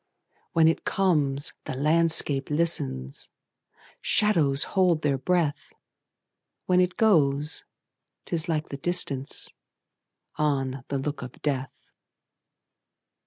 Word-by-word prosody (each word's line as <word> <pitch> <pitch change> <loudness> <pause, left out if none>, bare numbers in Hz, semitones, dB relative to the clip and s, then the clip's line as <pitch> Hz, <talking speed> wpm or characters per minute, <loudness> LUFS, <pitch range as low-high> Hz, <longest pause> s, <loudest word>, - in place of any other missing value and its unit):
When 160 -1 +5
it 165 - +1
comes, 150 -8 +1
the - - -4
landscape 150 -1 +2
listens, 70 - +1 0.7
Shadows 160 -10 +2
hold 180 -5 +2
their 140 -2 +1
breath; 165 0 -1 0.9
When 180 0 +3
it 180 0 -1
goes, 150 -8 +2 0.6
't - - -9
is 165 +2 -3
like 155 -1 -1
the 140 - -7
distanceOn 140 -5 -1 1.3
the 140 - -2
look 140 +1 -4
of 125 -1 -8
death. 135 -3 -4
150 Hz, 100 wpm, -26 LUFS, 140-170 Hz, 1.3 s, When